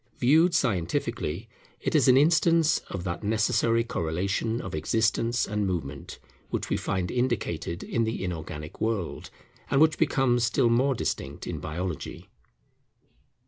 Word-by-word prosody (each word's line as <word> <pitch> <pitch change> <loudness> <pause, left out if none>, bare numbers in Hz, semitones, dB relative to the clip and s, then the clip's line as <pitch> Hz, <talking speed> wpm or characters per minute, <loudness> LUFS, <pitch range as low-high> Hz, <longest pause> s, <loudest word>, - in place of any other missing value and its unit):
Viewed 160 +7 +4
scientifically, 95 - -1 0.3
it - - -2
is - - +4
an 130 0 +7
instance 165 +1 +4
of 95 -3 -5
that 90 +2 -4
necessary 110 +2 +2
correlation 95 +4 -1
of - - -6
existence 115 +8 +1
and 105 -1 -1
movement, 75 -6 -4 0.3
which - - -3
we - - +3
find 90 -2 -2
indicated 105 -9 -2
in 115 - 0
the 110 -2 -2
inorganic 80 -3 -6
world, 110 -7 -2 0.4
and 135 - +2
which 155 0 +4
becomes 135 -6 +2
still 120 +1 +2
more 130 +3 +3
distinct - - -3
in - - -4
Biology. 85 +1 -5
110 Hz, 135 wpm, -27 LUFS, 90-125 Hz, 0.4 s, an